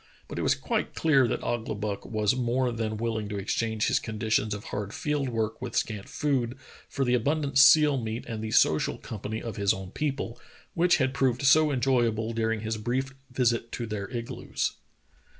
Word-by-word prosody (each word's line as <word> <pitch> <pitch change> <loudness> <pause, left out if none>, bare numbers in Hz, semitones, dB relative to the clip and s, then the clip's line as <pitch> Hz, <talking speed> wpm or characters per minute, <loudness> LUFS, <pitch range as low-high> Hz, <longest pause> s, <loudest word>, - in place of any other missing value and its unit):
But - - -5
it - - -1
was - - +3
quite - - -2
clear 140 -6 +4
that - - -2
Ouglibuck 105 -3 -3
was 110 +1 +1
more 125 0 +1
than 110 -2 -3
willing 110 -2 -2
to 105 - -3
exchange 110 +2 -1
his - - +2
conditions 110 -1 -1
of 105 0 -4
hard 105 0 -5
field 145 -3 -1
work 115 -2 -2
with - - -5
scant 105 -3 -2
food 130 -4 -1 0.3
for 135 - -1
the 125 - +2
abundant 140 +2 +1
seal 145 -1 +7
meat 110 +1 -4
and 110 -1 -5
the 110 - -3
social 80 -7 +3
company 110 +1 -6
of 115 - -5
his 100 -1 +2
own 95 -1 -8
people, 135 -5 -3 0.3
which 175 +1 +4
had 130 -3 +1
proved 130 0 +1
so 150 +2 +5
enjoyable 120 -4 +1
during 110 -1 0
his 110 0 -2
brief 130 +5 -2 0.2
visit 120 -2 0
to 120 - -3
their 105 -3 -4
igloos. 120 -2 -3
115 Hz, 185 wpm, -27 LUFS, 110-130 Hz, 0.3 s, seal